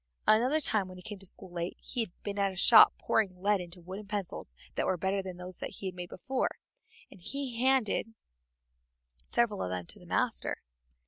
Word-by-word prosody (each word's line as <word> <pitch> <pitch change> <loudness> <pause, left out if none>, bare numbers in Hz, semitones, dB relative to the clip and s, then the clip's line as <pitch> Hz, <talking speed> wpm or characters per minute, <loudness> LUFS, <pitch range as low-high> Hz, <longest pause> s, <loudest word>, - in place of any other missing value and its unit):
Another 250 +8 +5
time 215 -9 +2
when 185 0 -10
he 180 - -11
came 210 0 -7
to 195 - -5
school 185 0 -9
late, 170 0 -3
he 250 - -5
had 225 - 0
been 205 -1 -3
at 195 -1 +2
a - - -10
shop 220 +5 +9
pouring 190 -5 +1
lead 200 0 +2
into 175 0 -8
wooden 190 +4 -7
pencils 205 -2 -4 0.2
that - - 0
were 185 - +2
better 190 +3 0
than 185 -2 -7
those 180 0 -8
he - - -5
had 185 - -2
made 180 -1 -7
before, 260 +8 -2 0.5
and 185 - -14
he 255 +2 -3
handed 255 -4 +2 1.1
several 235 -4 +1
of 90 - -1
them 90 -1 -3
to - - -10
the - - -15
master. - - 0
195 Hz, 200 wpm, -31 LUFS, 180-225 Hz, 1.1 s, shop